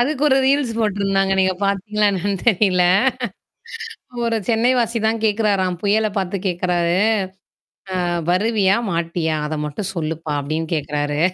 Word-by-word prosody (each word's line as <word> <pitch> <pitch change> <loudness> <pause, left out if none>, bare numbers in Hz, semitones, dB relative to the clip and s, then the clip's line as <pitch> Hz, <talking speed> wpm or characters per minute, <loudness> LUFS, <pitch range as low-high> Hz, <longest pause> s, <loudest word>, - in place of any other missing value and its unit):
அதுக்கு 280 +3 0
ஒரு 265 - +4
ரீல்ஸ் 275 -4 +2
போட்ருந்தாங்க. 195 -2 +1
நீங்க 185 0 +2
பார்த்தீங்களா 210 +2 0
என்னன்னு 195 +1 -1
தெரியல 185 -3 +3 1.4
ஒரு 230 -1 0
சென்னை 235 +1 +2
வாசி 230 -1 0
தான் 225 0 +1
கேட்கறாராம், 205 -4 +1
புயல 215 +1 +2
பார்த்து 190 +1 -1
கேட்கறாரு. 175 0 0 1.0
அ - - -1 0.3
வருவியா, 200 +1 +2
மாட்டியா? 165 -1 -1
அத 155 - -3
மட்டும் 190 +6 -4
சொல்லுப்பா 160 -2 -3
அப்டின்னு 155 +3 -3
கேட்கறாரு 145 0 -2
195 Hz, 125 wpm, -20 LUFS, 170-220 Hz, 1.4 s, ஒரு